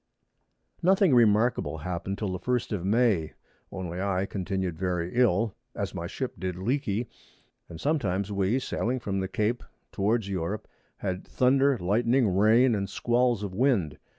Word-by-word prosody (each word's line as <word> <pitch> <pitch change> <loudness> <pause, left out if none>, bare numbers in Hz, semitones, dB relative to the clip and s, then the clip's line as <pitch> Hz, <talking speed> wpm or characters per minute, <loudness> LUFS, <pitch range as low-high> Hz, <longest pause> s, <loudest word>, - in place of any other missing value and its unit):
Nothing 185 -2 +4
remarkable 115 -5 +3
happen'd 90 +4 -4
till 105 -4 -2
the 90 - -4
1st 125 +5 -1
of 100 -5 -2
May, 105 -5 +2 0.4
only 90 -1 -5
I 95 -1 0
continued 95 -2 -3
very 90 0 -2
ill, 115 -3 +2 0.2
as - - -3
my - - -4
Ship - - -4
did 90 0 -3
leaky, 115 +2 -1 0.6
and 80 - -9
sometimes 105 - 0
we 100 +4 +1
[Sidenote: 130 - -3
Sailing 125 +3 -1
from 100 -5 -2
the 95 - -2
Cape 110 +5 -1 0.3
towards 105 +1 0
Europe.] 95 +2 -3 0.3
had 95 -2 -3
Thunder, 135 +1 +3
Lightning, 115 +2 +2
Rain, 115 +5 +5
and 100 -2 -2
Squalls 120 -2 +1
of 100 -2 -4
Wind. 95 - +1
105 Hz, 150 wpm, -27 LUFS, 95-120 Hz, 0.6 s, Rain